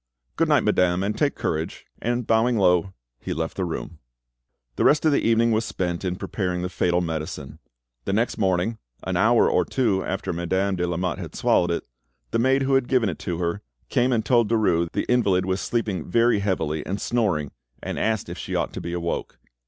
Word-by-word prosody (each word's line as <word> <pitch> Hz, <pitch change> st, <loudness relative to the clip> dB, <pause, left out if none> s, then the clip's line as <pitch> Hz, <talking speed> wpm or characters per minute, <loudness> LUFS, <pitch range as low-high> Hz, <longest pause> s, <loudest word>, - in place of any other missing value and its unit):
"Good -, -, +1 dB
night, -, -, +4 dB
madame; 90 Hz, 0 st, +2 dB
and 105 Hz, +2 st, -1 dB
take 145 Hz, -2 st, +1 dB
courage"; 80 Hz, +1 st, -3 dB, 0.2 s
and 120 Hz, +1 st, -1 dB
bowing 115 Hz, +2 st, +2 dB
low, 90 Hz, -1 st, +3 dB, 0.3 s
he -, -, -4 dB
left 80 Hz, +1 st, -3 dB
the 95 Hz, -, -1 dB
room. 80 Hz, -1 st, -5 dB, 0.8 s
The -, -, 0 dB
rest 150 Hz, +1 st, +4 dB
of 155 Hz, -, +5 dB
the 140 Hz, -, +2 dB
evening 115 Hz, 0 st, +3 dB
was 110 Hz, +1 st, +2 dB
spent 90 Hz, -4 st, -3 dB
in 90 Hz, -1 st, -1 dB
preparing 90 Hz, -2 st, -3 dB
the 90 Hz, -, -2 dB
fatal 90 Hz, -1 st, +1 dB
medicine. 80 Hz, -3 st, -5 dB, 0.5 s
The -, -, -1 dB
next 115 Hz, +4 st, 0 dB
morning, 95 Hz, +3 st, +1 dB, 0.2 s
an 95 Hz, -, -2 dB
hour 115 Hz, +6 st, +4 dB
or 90 Hz, -, +3 dB
two 100 Hz, 0 st, 0 dB
after -, -, -3 dB
Madame 95 Hz, +3 st, 0 dB
de 90 Hz, -1 st, -1 dB
Lamotte 85 Hz, -2 st, -2 dB
had -, -, -7 dB
swallowed 85 Hz, -, +2 dB
it, 85 Hz, -, -2 dB, 0.5 s
the -, -, +1 dB
maid 135 Hz, +3 st, +3 dB
who 135 Hz, +1 st, +1 dB
had 135 Hz, -2 st, +3 dB
given 125 Hz, -6 st, +2 dB
it 80 Hz, -, -6 dB
to 85 Hz, -, -3 dB
her 85 Hz, +3 st, -2 dB, 0.3 s
came 125 Hz, +2 st, +2 dB
and 110 Hz, -3 st, +1 dB
told 120 Hz, -4 st, +3 dB
Derues 90 Hz, -7 st, +2 dB
the -, -, -1 dB
invalid 100 Hz, -7 st, +2 dB
was 95 Hz, 0 st, -1 dB
sleeping 105 Hz, -9 st, -2 dB
very 115 Hz, +2 st, +3 dB
heavily 80 Hz, -6 st, -1 dB
and 100 Hz, +2 st, -3 dB
snoring, 95 Hz, -, 0 dB, 0.3 s
and -, -, -3 dB
asked 110 Hz, -2 st, 0 dB
if -, -, -7 dB
she -, -, -4 dB
ought -, -, -1 dB
to -, -, -5 dB
be 85 Hz, -, -5 dB
awoke. 85 Hz, -1 st, -3 dB
95 Hz, 205 wpm, -24 LUFS, 85-115 Hz, 0.8 s, of